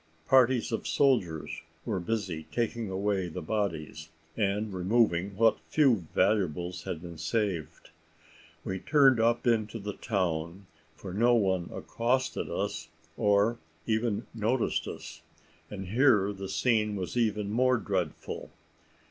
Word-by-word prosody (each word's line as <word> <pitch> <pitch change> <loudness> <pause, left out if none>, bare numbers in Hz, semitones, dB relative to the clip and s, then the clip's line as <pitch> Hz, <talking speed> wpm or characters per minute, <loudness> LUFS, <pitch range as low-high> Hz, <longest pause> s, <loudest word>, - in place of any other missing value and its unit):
Parties 130 -2 +4
of 115 - -2
soldiers 105 - +1 0.2
were - - -1
busy 90 -5 -3
taking 115 -2 -2
away 95 -1 -1
the 80 - -6
bodies, 80 -6 -3 0.3
and 105 0 0
removing 95 -1 +1
what 115 0 +4
few 125 - +3
valuables 90 -3 +1
had 85 -1 -4
been 85 -2 -9
saved. 90 -1 -2 0.7
We 95 0 -3
turned 135 -3 +4
up 115 +2 +2
into 115 -2 +1
the 105 -1 -5
town, 90 -3 -2 0.3
for 95 +2 -8
no 120 +4 +4
one 95 -5 +1
accosted 130 +3 -1 0.7
or 105 +2 +2 0.3
even 110 -1 0
noticed 115 +2 0
us; - - -8 0.5
and 95 -3 -6
here 110 -4 +4
the 95 -1 -7
scene 105 0 +1
was 95 +2 -4
even 105 -4 0
more 130 +3 +3
dreadful. 95 -8 -3
105 Hz, 120 wpm, -29 LUFS, 95-115 Hz, 0.7 s, Parties